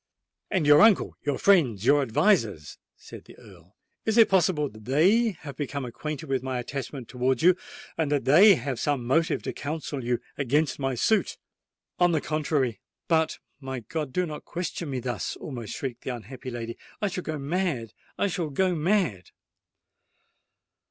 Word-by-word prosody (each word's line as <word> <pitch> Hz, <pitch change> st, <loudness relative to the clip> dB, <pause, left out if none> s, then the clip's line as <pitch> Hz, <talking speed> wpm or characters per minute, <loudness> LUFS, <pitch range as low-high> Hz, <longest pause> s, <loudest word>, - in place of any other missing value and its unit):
"And 185 Hz, -6 st, 0 dB
your 145 Hz, 0 st, +7 dB
uncle—your 190 Hz, -, +3 dB
friends—your 145 Hz, -, +4 dB
advisers?" 115 Hz, -, +1 dB, 0.2 s
said -, -, -12 dB
the -, -, -15 dB
Earl,—"it 220 Hz, +1 st, -7 dB
is 225 Hz, -, +9 dB
possible 175 Hz, -6 st, +2 dB
that 110 Hz, -3 st, -14 dB
they 195 Hz, -, +3 dB
have 140 Hz, -4 st, -8 dB
become 140 Hz, -1 st, -4 dB
acquainted 140 Hz, +4 st, -5 dB
with 135 Hz, -2 st, 0 dB
my 130 Hz, -1 st, -3 dB
attachment 130 Hz, 0 st, -5 dB
towards 125 Hz, +1 st, 0 dB
you—that 160 Hz, -4 st, 0 dB
they 185 Hz, +9 st, +7 dB
have 135 Hz, -6 st, -4 dB
some 140 Hz, -5 st, -1 dB
motive 160 Hz, +6 st, +1 dB
to -, -, -4 dB
counsel 145 Hz, -2 st, -4 dB
you 120 Hz, 0 st, 0 dB, 0.2 s
against 145 Hz, +3 st, +1 dB
my 135 Hz, -1 st, -1 dB
suit?" 215 Hz, -, +1 dB, 0.6 s
"On 175 Hz, -1 st, +4 dB
the 160 Hz, -, +2 dB
contrary——But, 155 Hz, -, -1 dB, 0.2 s
my 130 Hz, -3 st, -5 dB
God! 150 Hz, +5 st, -4 dB
do 180 Hz, +6 st, 0 dB
not 150 Hz, -3 st, -7 dB
question 170 Hz, -2 st, -5 dB
me 130 Hz, -2 st, -2 dB
thus!" 120 Hz, -3 st, -3 dB
almost 120 Hz, -7 st, -7 dB
shrieked 125 Hz, -3 st, -5 dB
the 125 Hz, -, -3 dB
unhappy 125 Hz, +3 st, -9 dB
lady. 115 Hz, -1 st, -6 dB, 0.2 s
"I 210 Hz, -, 0 dB
shall 180 Hz, -1 st, -3 dB
go 155 Hz, -1 st, -3 dB
mad—I 145 Hz, -, -3 dB
shall 180 Hz, -5 st, -2 dB
go 185 Hz, +6 st, +1 dB
mad!" 170 Hz, -, 0 dB
145 Hz, 150 wpm, -26 LUFS, 125-170 Hz, 0.6 s, is